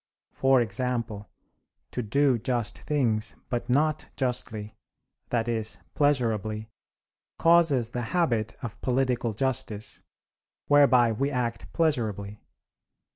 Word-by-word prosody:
For 135 -1 +4
example, 115 -1 -2 0.6
to 125 - -2
do 130 +3 +2
just 120 -1 -2
things, 115 -7 0
but 120 0 -3
not 150 +4 +1
justly, 115 -5 -2 0.5
that 120 -1 0
is, 110 -2 -2 0.2
pleasurably, 110 -6 0 0.7
causes 160 -9 +4
the 120 - -3
habit 120 - 0
of 115 - -6
political 125 -3 0
justice, 110 -4 -2 0.6
whereby 135 -5 +5
we 135 +6 0
act 115 - -3
pleasurably. 105 - -1
120 Hz, 100 wpm, -27 LUFS, 110-135 Hz, 0.7 s, whereby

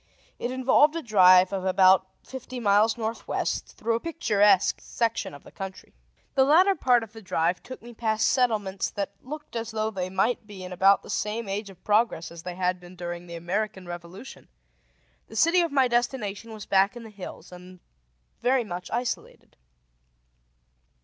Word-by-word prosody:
It 240 - -2
involved 260 +4 +3
a 330 - -3
drive 185 -4 +6
of 190 -1 -2
about 190 0 +4 0.2
fifty 255 -1 -8
miles 215 +1 +3
northwest, 225 0 -3
through 230 +1 -1
a 225 - 0
picturesque 210 - +2
section 230 -1 -2
of 145 - -13
the - - -15
country. 190 -1 -8 0.4
The 270 - +4
latter 350 +8 +5
part 250 -8 +3
of 220 -1 -12
the 225 - -11
drive 175 -2 0
took 255 -2 -10
me 240 0 -11
past 220 -1 0
settlements 215 -7 0
that 200 -1 -4
looked 300 0 -9
as 230 0 -3
though 220 -1 -2
they 185 -3 -3
might 210 +4 0
be 195 -3 -9
in 180 0 -7
about 195 +2 +4
the - - -8
same 215 +2 -2
stage 200 +1 -4
of 185 -2 -16
progress 210 -6 +1
as 170 -1 -10
they 180 +1 -6
had 180 0 0
been 180 +1 -14
during 175 0 -6
the 170 - -8
American 190 +3 -3
Revolution. 175 +7 -10 0.8
The - - -12
city 340 +2 +4
of 335 - -1
my 270 -2 +3
destination 235 -3 -2
was 215 -2 -8
back 195 +3 +3
in 240 - -9
the 220 - -11
hills, 195 -3 -10
and 180 0 -12 0.6
very 250 0 +2
much 180 -4 -7
isolated. 240 +1 -4
210 Hz, 175 wpm, -26 LUFS, 185-240 Hz, 0.8 s, drive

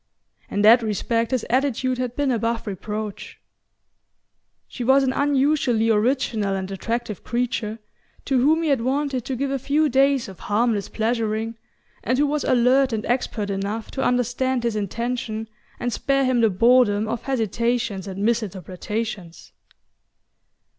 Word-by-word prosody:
In 205 - -1
that 230 +3 +7
respect 230 +2 -1
his 255 -3 -1
attitude 255 0 0
had 250 -1 -3
been 285 -2 +1
above 230 0 -1
reproach. 210 +1 -6 1.3
She 250 - -6
was 265 +3 +4
an 260 -1 +1
unusually 275 -5 +2
original 220 -3 +1
and 190 0 -4
attractive 230 +2 -4
creature, 235 -3 -2 0.5
to 270 -2 +2
whom 315 +5 +3
he 320 - 0
had 275 -5 +2
wanted 265 0 -1
to 265 - -3
give 275 +2 -2
a 275 - -1
few 295 +4 +1
days 270 -1 +3
of 190 -2 -11
harmless 215 -1 0
pleasuring, 225 0 -1 0.5
and 255 - +1
who 290 - +3
was 295 +1 -1
alert 255 +1 +3
and 220 0 -2
expert 230 -4 -1
enough 200 +3 -3
to 265 - -3
understand 250 0 0
his 235 -2 0
intention 225 +1 -3 0.3
and 245 -1 -2
spare 275 -1 +1
him 255 -2 +2
the 225 - +4
boredom 215 +1 +3
of 235 +1 -3
hesitations 230 -4 -1
and 195 +1 -5
misinterpretations. 210 -3 -3
235 Hz, 145 wpm, -23 LUFS, 215-260 Hz, 1.3 s, that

